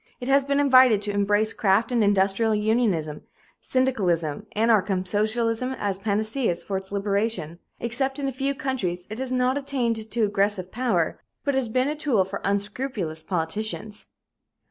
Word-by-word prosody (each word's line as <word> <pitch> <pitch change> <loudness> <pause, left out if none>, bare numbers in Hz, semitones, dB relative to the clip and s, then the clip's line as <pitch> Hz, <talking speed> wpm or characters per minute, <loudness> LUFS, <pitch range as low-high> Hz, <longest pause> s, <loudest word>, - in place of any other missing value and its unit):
It 245 - -6
has 275 0 +5
been 280 +1 0
invited 255 -6 +6
to 205 - -2
embrace 205 +2 +1
craft 210 +4 +2
and 235 -3 +2
industrial 205 +2 +2
unionism, 210 -9 0 0.4
syndicalism, 195 - 0
anarchism, 205 -4 +2
socialism 230 +5 0
as 200 -6 -2
panaceas 215 -1 0
for 195 - -4
its 190 0 -3
liberation. 200 -4 -1 0.2
Except 265 +4 -1
in 280 -1 -2
a - - -1
few 275 +2 -2
countries, 190 -11 -3
it 220 - -5
has 260 -1 -3
not 255 +2 +1
attained 235 -6 -2
to 230 0 0
aggressive 200 -2 0
power, 220 -9 0 0.2
but 280 - 0
has 265 -3 0
been 255 +4 +1
a 300 - -1
tool 275 -11 +1
for 195 +1 -6
unscrupulous 200 -4 -2
politicians. 205 +6 -3
220 Hz, 155 wpm, -25 LUFS, 195-255 Hz, 0.4 s, invited